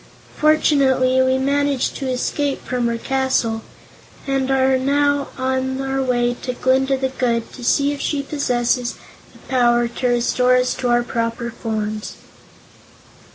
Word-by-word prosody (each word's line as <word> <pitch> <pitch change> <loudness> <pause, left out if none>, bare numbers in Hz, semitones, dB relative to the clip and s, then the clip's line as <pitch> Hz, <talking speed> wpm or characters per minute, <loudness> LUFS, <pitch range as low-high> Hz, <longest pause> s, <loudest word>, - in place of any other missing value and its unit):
"Fortunately, 270 -4 +3
we 260 0 +2
managed 280 0 0
to 270 -2 -3
escape 275 +2 -2
from 245 -1 -1
her 235 0 -1
castle, 260 -3 0 0.6
and 270 -1 -1
we 270 - +3
are 265 0 +3
now 285 +1 +1
on 260 0 -1
our 270 0 -1
way 245 -2 +1
to 250 - -3
Glinda 265 +2 +1
the 265 0 -1
Good 235 -3 -2
to 250 - -10
see 280 +4 +2
if 285 - -5
she 285 -2 -1
possesses 250 -4 -1 0.4
the - - -18
power 240 -2 +3
to 240 +2 -3
restore 250 +1 +2
us 250 0 +2
to 250 - -3
our 240 0 +3
former 230 0 -3 0.4
shapes." 215 -1 -7
260 Hz, 150 wpm, -20 LUFS, 245-270 Hz, 0.6 s, Fortunately